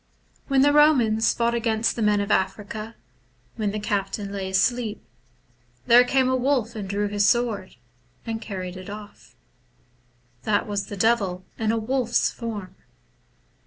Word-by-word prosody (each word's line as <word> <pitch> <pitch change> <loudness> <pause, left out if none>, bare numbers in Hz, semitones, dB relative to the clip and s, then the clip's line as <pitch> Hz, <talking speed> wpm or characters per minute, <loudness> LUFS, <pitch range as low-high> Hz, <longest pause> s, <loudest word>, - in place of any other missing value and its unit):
When 270 -1 +3
the 290 - +5
Komans 255 -8 +4
fought 235 0 +1
against 230 -1 0
the 235 - -4
men 210 -1 +3
of 200 - -3
Africa, 210 +3 -2 0.6
when 215 -3 -1
the 210 +1 -3
captain 200 -1 -2
lay 195 -1 -4
asleep, 220 +3 0 0.8
there 245 0 +7
came 260 +1 +2
a 260 - +2
wolf 255 -3 0
and 200 -3 -5
drew 205 +1 0
his 205 0 0
sword, 240 -4 -1 0.5
and 225 -1 -4
carried 185 -4 -6
it 185 +1 -9
off. 205 0 -11 1.1
That 205 +5 +1
was 200 -1 -3
the 205 - -7
Devil 195 -4 +1
in 220 -1 +1
a 230 - 0
wolf's 240 +1 0
form. 205 -6 -6
215 Hz, 150 wpm, -24 LUFS, 200-235 Hz, 1.1 s, there